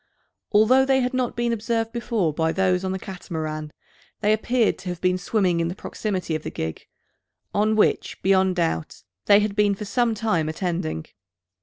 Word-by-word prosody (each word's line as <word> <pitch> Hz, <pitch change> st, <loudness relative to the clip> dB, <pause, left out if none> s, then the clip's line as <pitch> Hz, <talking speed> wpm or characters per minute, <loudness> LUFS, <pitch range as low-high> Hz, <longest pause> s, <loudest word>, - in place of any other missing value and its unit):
Although 225 Hz, +5 st, +5 dB
they 265 Hz, 0 st, +3 dB
had 250 Hz, +1 st, -1 dB
not 255 Hz, -2 st, -1 dB
been 235 Hz, 0 st, 0 dB
observed 225 Hz, 0 st, -1 dB
before 230 Hz, -9 st, -1 dB
by 160 Hz, +1 st, +1 dB
those 185 Hz, 0 st, +1 dB
on 190 Hz, -, -1 dB
the 190 Hz, -, -2 dB
Catamaran, 160 Hz, -5 st, -5 dB, 0.5 s
they 210 Hz, +1 st, +3 dB
appeared 230 Hz, +1 st, +1 dB
to 185 Hz, -1 st, -6 dB
have 175 Hz, -1 st, -4 dB
been 185 Hz, 0 st, +1 dB
swimming 185 Hz, -2 st, +1 dB
in 165 Hz, -, +1 dB
the 175 Hz, -, -4 dB
proximity 190 Hz, -5 st, -3 dB
of 155 Hz, -, -1 dB
the -, -, -5 dB
gig, 80 Hz, 0 st, -5 dB, 0.7 s
on 215 Hz, +1 st, +2 dB
which, 215 Hz, -, +1 dB
beyond 190 Hz, -1 st, +3 dB
doubt, 165 Hz, -, -2 dB, 0.2 s
they 205 Hz, 0 st, +6 dB
had 210 Hz, -1 st, -1 dB
been 205 Hz, -1 st, +3 dB
for 210 Hz, -, -6 dB
some 230 Hz, +2 st, +1 dB
time 200 Hz, -8 st, 0 dB
attending. 160 Hz, -, -3 dB
195 Hz, 180 wpm, -24 LUFS, 170-225 Hz, 0.7 s, they